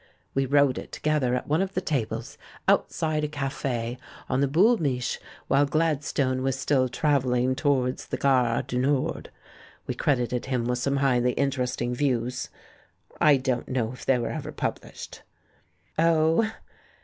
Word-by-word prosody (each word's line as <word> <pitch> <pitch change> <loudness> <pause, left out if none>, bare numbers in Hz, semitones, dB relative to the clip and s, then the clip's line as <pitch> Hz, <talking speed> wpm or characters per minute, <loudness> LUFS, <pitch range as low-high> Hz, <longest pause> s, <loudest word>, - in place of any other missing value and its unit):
We 135 0 +1
wrote 140 -1 +3
it - - -10
together 150 -5 0
at 125 - -3
one 155 +4 +2
of 195 0 -3
the - - +2
tables 140 - -3 0.3
outside 155 -1 +1
a - - +1
cafe 135 -4 -3 0.3
on 130 - 0
the 140 - +3
Boul' 200 - +4
INIich' 125 -5 -1 0.3
while 140 +1 +3
Gladstone 145 -4 0
was 135 0 0
still 135 -2 +1
travel 140 -2 +1
ling 125 +1 +2
towards 130 -2 0
the - - -3
gare 125 -4 +2
du 125 - -3
Nord. 135 +1 0 0.6
We - - -2
credited 125 -3 0
him 125 -3 -1
with 125 +1 0
some 140 +2 0
highly 125 -2 +2
interesting 125 -3 -1
views. 125 -2 -1 0.7
I 150 -2 +6
don't 130 -2 -2
know 120 -3 -1
if 125 - -11
they 135 - +3
were 120 - -2
ever - - -5
published." - - -5 0.8
"Oh!" 165 +6 +3
135 Hz, 155 wpm, -26 LUFS, 125-145 Hz, 0.8 s, I